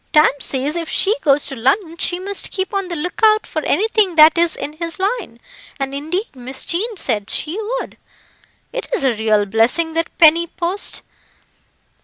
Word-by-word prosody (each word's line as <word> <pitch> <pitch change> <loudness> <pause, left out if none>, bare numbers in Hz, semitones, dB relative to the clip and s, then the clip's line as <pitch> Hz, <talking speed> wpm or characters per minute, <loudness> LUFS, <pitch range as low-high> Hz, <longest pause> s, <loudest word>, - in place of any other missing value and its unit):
Tam 305 0 +6
says 275 +3 -1
if 335 -2 -4
she 415 +3 +2
goes 285 -1 +3
to 270 - -3
London 320 - 0
she 350 +1 -1
must 395 +1 -2
keep 380 0 -3
on 390 -2 -1
the 350 - -5
look 345 +6 -5
out 430 0 +5
for 315 -3 -4
anything 410 0 +2
that 310 0 +7
is 340 0 +2
in 295 - -6
his 335 0 -4
line, 395 - -3 0.4
and 270 0 -3
indeed 320 +7 -4
Miss 260 +1 -2
Jean 415 +6 -2
said 210 - -2
she 340 +8 0 0.2
would. - - -8 0.8
It - - -4
is - - -2
a 265 -3 +2
real 215 -1 +1
blessing 235 +11 +1
that 330 0 -3
penny 335 +1 +5
post. 350 +4 -2
330 Hz, 180 wpm, -18 LUFS, 275-380 Hz, 0.8 s, that